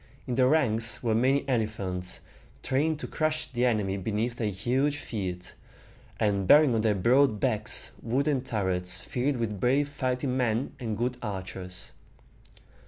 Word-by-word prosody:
In 125 - -3
the 125 +1 +4
ranks 120 -7 +1
were 115 -2 +1
many 135 +5 +2
elephants, 100 -7 -2 0.4
trained 150 +4 +1
to - - -4
crush 155 -1 -1
the 125 0 +1
enemy 105 -5 +1
beneath 110 +5 -2
their 110 -3 0
huge 130 +9 0
feet, 95 -9 -5 0.7
and 100 -3 +1
bearing 145 0 +7
on 110 - +2
their 110 -1 +2
broad 120 +3 +3
backs 115 -4 0
wooden 135 +4 0
turrets 95 -7 -2
filled 130 +7 -1
with 110 -4 -2
brave 135 +6 +2
fighting 130 -2 -2
men 120 0 0
and 110 -4 -3
good 120 +2 -1
archers. 95 -3 -6
120 Hz, 145 wpm, -28 LUFS, 105-130 Hz, 0.7 s, bearing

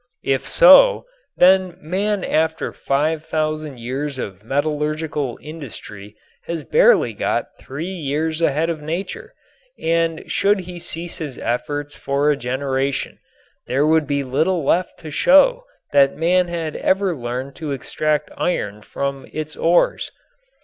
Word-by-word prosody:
If 135 -1 0
so, - - +7 0.3
then 185 -1 +4
man 195 +5 -1
after 160 0 0
five 150 +3 0
thousand 155 -4 -3
years 135 +4 -4
of 100 -5 -6
metallurgical 150 0 -2
industry 110 -9 -9 0.3
has 165 -2 -4
barely 485 +1 +4
got - - -2
three 155 +8 -6
years 155 0 -2
ahead 165 +1 +1
of 155 -2 -6
nature, 170 +5 -5 0.4
and 165 0 0
should 200 0 +1
he 180 -1 -9
cease 170 0 -6
his 145 -5 -6
efforts 145 +5 -3
for 140 +2 +1
a - - +2
generation 135 +1 -2 0.5
there 135 +3 +1
would 155 -1 +3
be 140 0 0
little 160 +6 0
left 175 +6 0
to 155 -2 -8
show - - +4 0.3
that 140 -1 +4
man 180 +3 +2
had 165 -3 -4
ever 190 -2 +1
learned 125 +1 -5
to 155 -3 -5
extract 150 +3 -1
iron 105 - -2
from 140 +3 -4
its 155 0 -5
ores. 170 +1 +2
155 Hz, 135 wpm, -20 LUFS, 140-170 Hz, 0.5 s, so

